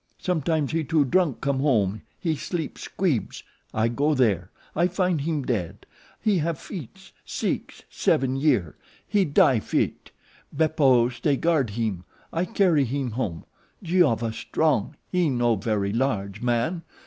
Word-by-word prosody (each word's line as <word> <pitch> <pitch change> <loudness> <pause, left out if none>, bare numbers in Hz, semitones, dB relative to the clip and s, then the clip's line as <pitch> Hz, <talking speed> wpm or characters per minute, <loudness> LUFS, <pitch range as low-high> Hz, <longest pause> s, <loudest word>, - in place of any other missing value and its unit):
Sometimes 160 -4 0
he 160 0 0
too 150 0 +2
drunk 170 -1 +1
come 140 -2 0
home 110 -8 +1 0.2
he 165 -3 0
sleep 160 +2 -4
Squeebs. 170 - -2 0.3
I 110 +1 +1
go 145 +6 +1
there. 100 -9 +2 0.3
I 170 +3 +3
find 180 -3 0
heem 150 -1 -1
dead. 105 -10 -3 0.3
He 210 -5 +2
have 165 0 -1
fits, 190 - -9
six, - - -3
seven 130 0 +1
year. 135 - +1 0.3
He 205 -2 +2
die 140 -5 +4
fit. - - -2 0.4
Beppo 135 -7 +3
stay 140 +3 0
guard 160 -7 +2
heem. 105 -6 -1 0.3
I 170 +2 0
carry 185 -8 +3
heem 135 0 -2
home. 105 -8 -3 0.4
Giova 145 -11 +2
strong, 145 -1 0 0.2
he 180 -3 +2
no 120 -3 +2
very 105 -1 -1
large 105 -6 -1
man. 120 +8 0
140 Hz, 140 wpm, -25 LUFS, 115-165 Hz, 0.4 s, die